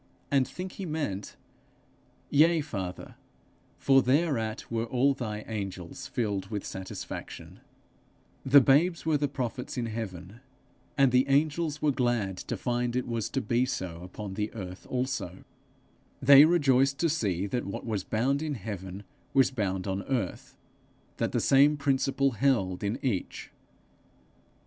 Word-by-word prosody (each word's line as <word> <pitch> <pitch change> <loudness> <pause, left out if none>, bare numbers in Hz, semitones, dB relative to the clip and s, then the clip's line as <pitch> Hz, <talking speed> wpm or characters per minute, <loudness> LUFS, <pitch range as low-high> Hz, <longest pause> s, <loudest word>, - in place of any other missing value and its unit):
and 135 -2 +3
think 185 +1 -6
he 195 - -7
meant, 145 -11 -3 1.0
'Yea, 160 +3 +5
Father, 95 - -5 0.6
for 135 -1 +4
thereat 130 -5 0
were 115 0 -1
all 130 +4 +2
thy 110 -5 -4
angels 95 -6 -6
filled 100 -5 -2
with 105 -2 -4
satisfaction,' 95 0 -7 0.8
The 140 +1 +7
babes 160 +7 +3
were 160 -2 +3
the 145 - +1
prophets 125 -2 -4
in 120 - -1
heaven, 105 -3 -6 0.6
and 135 -2 +5
the 125 +2 +3
angels 150 +2 +1
were 150 - +4
glad 120 -7 0
to - - -4
find 120 -1 -1
it 125 - -1
was 115 -2 -2
to 135 - -1
be 120 +2 +1
so 90 -9 -4
upon 95 +2 -7
the 105 +2 -2
earth 90 -3 -8
also; 125 -8 -3 0.8
they 140 +2 +9
rejoiced 140 -5 +3
to 170 - +2
see 100 - 0
that 120 +3 -3
what 100 - -5
was 105 -5 -2
bound 130 +8 0
in 155 -2 -2
heaven, 95 -3 -7 0.3
was 135 0 +5
bound 95 -6 -2
on 95 0 -2
earth; 120 -9 -3 0.6
that - - -1
the - - +1
same 145 +2 +5
principle 135 0 +1
held 110 -7 +1
in 100 +3 -1
each. 105 -8 -3
125 Hz, 145 wpm, -28 LUFS, 100-140 Hz, 1.0 s, they